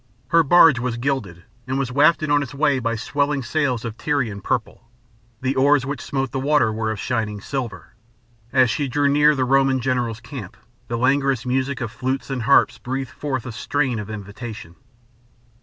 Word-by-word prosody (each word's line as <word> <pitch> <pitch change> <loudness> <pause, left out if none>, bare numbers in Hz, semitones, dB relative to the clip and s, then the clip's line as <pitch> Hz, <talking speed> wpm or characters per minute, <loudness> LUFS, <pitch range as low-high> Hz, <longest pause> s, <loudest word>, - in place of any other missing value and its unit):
Her 165 +3 +5
barge 165 -3 +6
was 120 -1 -2
gilded, 120 -10 -3 0.2
and 130 +1 -1
was 135 -3 -2
wafted 150 +2 +3
on 145 0 +4
its 140 0 -6
way 140 -2 +2
by 115 -1 -1
swelling 140 +4 -1
sails 125 -2 -1
of 115 -1 -5
Tyrian 120 -9 -1
purple. 115 +1 -3 0.5
The 130 +1 -1
oars 140 0 +3
which 140 +1 -4
smote 135 -2 -3
the 135 - -2
water 135 -5 +2
were 110 0 -2
of 110 -2 -3
shining 110 -4 -2
silver. 115 - -5 0.6
As 130 -3 +4
she 145 +5 -1
drew 145 +3 +1
near 150 +1 +4
the 130 -2 0
Roman 135 0 +3
general's 120 -3 -1
camp 115 -5 -9 0.3
the 120 - -2
languorous 135 0 +1
music 130 +1 -1
of 115 -2 -3
flutes 130 +4 -3
and 130 -2 -2
harps 125 -1 +3
breathed 130 +1 -4
forth 135 -5 -4
a 125 - -5
strain 130 +1 -1
of 105 - -7
invitation. 105 -3 -8
130 Hz, 180 wpm, -22 LUFS, 115-140 Hz, 0.6 s, barge